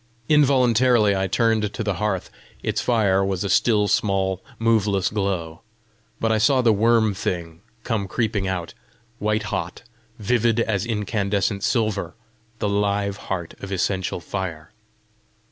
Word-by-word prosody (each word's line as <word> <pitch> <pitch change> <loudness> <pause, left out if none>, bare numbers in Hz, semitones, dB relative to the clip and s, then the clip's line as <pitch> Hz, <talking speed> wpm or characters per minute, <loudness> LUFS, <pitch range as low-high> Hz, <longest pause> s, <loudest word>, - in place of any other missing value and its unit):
Involuntarily 125 -7 +4
I 95 0 0
turned 110 +1 +1
to 115 - -4
the 105 -2 0
hearth: 100 -4 -1 0.3
its - - -1
fire 100 -5 +2
was 95 -1 -1
a 100 - -2
still 105 -1 +3
small 95 -2 0
moveless 105 -4 +1
glow. 95 -6 -2 0.6
But 115 - +1
I 110 - +2
saw 130 +3 +3
the 115 -2 +5
worm 110 0 +3
thing 85 -4 -4 0.2
come 110 -5 -1
creeping 105 -2 -1
out, 90 -3 -3 0.5
white 105 +1 0
hot, 90 +3 -4 0.3
vivid 115 +1 +1
as 110 -2 0
incandescent 100 -2 -1
silver, 110 -5 0 0.4
the 105 - -1
live 100 0 0
heart 90 -4 -3
of 100 - -8
essential 95 -1 -1
fire. 85 -2 -5
105 Hz, 135 wpm, -23 LUFS, 95-115 Hz, 0.6 s, the